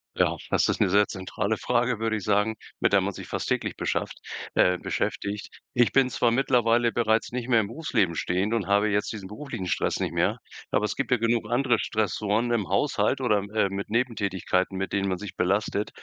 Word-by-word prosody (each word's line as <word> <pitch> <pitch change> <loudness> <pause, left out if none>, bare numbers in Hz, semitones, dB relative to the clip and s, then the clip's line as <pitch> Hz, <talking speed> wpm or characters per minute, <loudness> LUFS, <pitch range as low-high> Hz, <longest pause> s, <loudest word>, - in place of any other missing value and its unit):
Ja, - - +2
das - - +3
ist - - 0
ne 95 - +3
sehr 105 +1 +4
zentrale 100 +3 -3
Frage, 125 -1 +1
würde 110 0 -1
ich 100 - -6
sagen, 105 +1 +2 0.3
mit - - +2
der - - +6
man - - -2
sich - - -9
fast - - -3
täglich - - -1
beschafft - - -2 0.3
äh, 90 0 +4
beschäftigt. 100 +3 -3 0.2
Ich 120 -1 +3
bin 135 -2 +3
zwar 120 - +2
mittlerweile 120 -2 +3
bereits 110 0 +1
nicht 125 -1 -4
mehr 115 -2 +5
im 100 - -3
Berufsleben 115 - 0
stehend 95 +6 -1
und 110 -4 -1
habe 100 +1 +3
jetzt 105 0 0
diesen 105 -4 -7
beruflichen 115 -2 -6
Stress 90 - 0
nicht - - -2
mehr, - - +1 0.3
aber 105 - +1
es 105 - -3
gibt 140 - -2
ja 125 - +4
genug 115 -1 0
andere 120 -2 +2
Stressoren 110 +2 0
im 105 -5 0
Haushalt - - +1
oder 105 - +3
m 100 +1 -7
äh, 100 -3 +3
mit 100 +1 -5
Nebentätigkeiten, 100 -5 0
mit 95 0 -3
denen 100 -1 0
man 95 - -1
sich 105 -1 -8
belastet 100 +2 0
105 Hz, 210 wpm, -26 LUFS, 100-120 Hz, 0.3 s, der